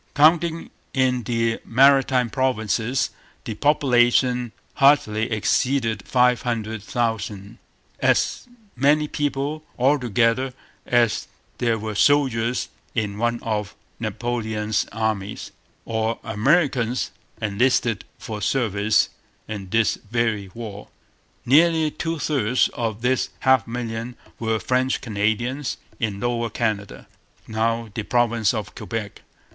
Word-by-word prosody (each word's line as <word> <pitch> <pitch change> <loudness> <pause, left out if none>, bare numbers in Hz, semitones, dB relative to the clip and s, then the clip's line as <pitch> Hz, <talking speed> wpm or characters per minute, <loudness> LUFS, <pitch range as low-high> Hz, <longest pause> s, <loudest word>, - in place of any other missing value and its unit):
Counting 165 +2 +3 0.2
in 130 -2 +2
the 115 -1 0
Maritime 130 -1 +4
Provinces, 125 -1 0 0.3
the 110 - -4
population 125 -2 +3 0.2
hardly 120 -6 +3
exceeded 115 +1 0
five 125 -1 +3
hundred 110 -3 -3
thousand 110 -3 -3 0.4
as - - +1 0.3
many 145 +4 +3
people, 145 +1 -2
altogether, 125 -1 +2 0.3
as 120 -3 +2 0.3
there 115 -2 +1
were 110 0 -4
soldiers 125 0 +2 0.3
in 105 -3 -2
one 120 0 +1
of 105 -2 -2 0.2
Napoleon's 110 -1 -2
armies, 110 -2 -3 0.3
or 110 0 -1
Americans 125 +1 +1 0.3
enlisted 115 0 +1
for 105 -2 -6
service 105 -1 +2 0.4
in 100 -3 -6
this 115 +2 +2
very 110 -4 0
war. 105 -3 -7 0.6
Nearly 160 +3 +4
two 165 +1 -3
thirds 130 -5 +1
of 115 -1 -4
this 130 +1 +1
half 130 0 +4
million 115 0 -4 0.2
were 110 -1 0
French 130 +2 +1
Canadians 120 +5 -1 0.2
in 105 -4 -2
Lower 120 0 -1
Canada, 110 -3 -3 0.4
now 115 +1 -1
the 110 - -2
province 115 -1 +2
of 110 -4 -4
Quebec. 110 -3 -5
115 Hz, 105 wpm, -23 LUFS, 110-130 Hz, 0.6 s, Maritime